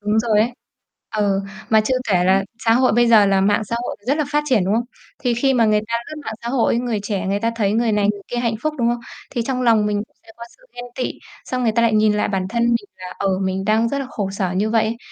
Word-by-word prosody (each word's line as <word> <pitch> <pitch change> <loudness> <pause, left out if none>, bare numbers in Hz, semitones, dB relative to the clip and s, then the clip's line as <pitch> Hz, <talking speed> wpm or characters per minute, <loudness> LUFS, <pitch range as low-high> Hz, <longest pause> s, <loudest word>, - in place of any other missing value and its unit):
Đúng 210 +1 +1
rồi 220 -2 +2
ấy. 240 +3 +1 0.6
Ừ, 200 -2 +1 0.3
mà 220 -1 +6
chưa 215 +4 0
kể 180 -3 +3
là 190 +1 +3 0.2
xã 225 - +4
hội 255 -1 +3
bây 240 +1 +4
giờ 215 -3 +6
là 195 -1 +3
mạng 205 +2 +2
xã 230 +3 -3
hội - - -4
thì 205 - -28
rất 280 +3 +2
là 305 - +1
phát 295 0 +1
triển, 220 -8 +3
đúng 200 +3 +1
không? 235 +1 +1 0.3
Thì 245 -3 0
khi 270 +2 +2
mà 230 -2 +4
người 210 -1 +3
ta 230 - -2
lướt - - -7
mạng 220 - -4
xã 235 - -4
hội, 240 -2 +1
người 240 -4 -2
trẻ 200 -3 -3
người 200 +1 0
ta 230 - +1
thấy 205 -3 +1
người 225 0 +1
này, 205 -1 +2
người 200 - -10
kia 245 - -4
hạnh 235 -2 0
phúc, 310 0 -1
đúng 235 -1 +2
không? 240 0 -1 0.3
Thì 235 - -2
trong 255 -2 -1
lòng 225 -3 +4
mình 210 -1 0
cũng - - -40
sẽ - - -26
có 235 - -8
sự - - -28
ghen 245 - -7
tị, 255 - -2 0.3
xong 255 -1 -3
người 225 - +2
ta 235 +1 +2
lại 230 -1 +3
nhìn 215 0 +4
lại 210 - 0
bản 190 -2 -1
thân 235 +2 -1
mình 235 0 +3 0.2
là, 180 0 -9
ờ, 190 -1 0
mình 190 0 -2
đang 220 +3 +2
rất 280 - -2
là 270 - -3
khổ 200 -4 -3
sở 190 -2 -2
như 205 +4 0
vậy 225 -1 +3
ấy. 225 +2 -2
220 Hz, 300 wpm, -20 LUFS, 205-240 Hz, 0.6 s, mà